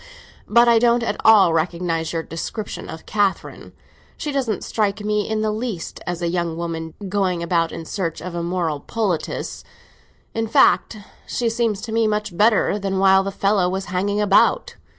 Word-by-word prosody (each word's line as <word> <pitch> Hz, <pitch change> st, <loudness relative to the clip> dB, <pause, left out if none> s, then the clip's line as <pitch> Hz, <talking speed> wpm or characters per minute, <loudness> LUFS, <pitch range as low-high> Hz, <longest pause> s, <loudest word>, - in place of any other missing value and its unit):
But 235 Hz, +2 st, +5 dB
I 235 Hz, -1 st, +5 dB
don't 235 Hz, 0 st, +3 dB
at 210 Hz, -2 st, -2 dB
all 205 Hz, -6 st, +6 dB
recognise 165 Hz, 0 st, -1 dB
your 165 Hz, -1 st, -2 dB
description 200 Hz, +7 st, -6 dB
of 160 Hz, -, -9 dB
Catherine. 205 Hz, -2 st, -2 dB, 0.5 s
She 295 Hz, -, -4 dB
doesn't 255 Hz, -7 st, -1 dB
strike 210 Hz, -1 st, -1 dB
me 210 Hz, 0 st, -1 dB
in 220 Hz, 0 st, -1 dB
the 215 Hz, 0 st, 0 dB
least 215 Hz, -5 st, -5 dB
as 175 Hz, 0 st, -3 dB
a -, -, +1 dB
young 170 Hz, -1 st, -2 dB
woman 165 Hz, -1 st, -5 dB
going 185 Hz, -3 st, 0 dB
about 170 Hz, -1 st, +1 dB
in 165 Hz, -, -7 dB
search 170 Hz, -2 st, -3 dB
of 180 Hz, 0 st, -7 dB
a 170 Hz, -, -3 dB
moral 170 Hz, -3 st, -2 dB
poultice. 200 Hz, -3 st, -3 dB, 0.7 s
In 225 Hz, 0 st, -1 dB
fact, 220 Hz, -, +3 dB, 0.3 s
she 235 Hz, -2 st, -1 dB
seems 225 Hz, -3 st, -1 dB
to 225 Hz, +1 st, -6 dB
me 225 Hz, 0 st, +2 dB
much 210 Hz, -3 st, -2 dB
better 210 Hz, 0 st, +3 dB
than 195 Hz, -1 st, -2 dB
while 190 Hz, 0 st, +5 dB
the 195 Hz, +1 st, -3 dB
fellow 195 Hz, -2 st, +1 dB
was 190 Hz, +1 st, -3 dB
hanging 200 Hz, +3 st, 0 dB
about. 210 Hz, -, +3 dB
195 Hz, 175 wpm, -21 LUFS, 170-220 Hz, 0.7 s, all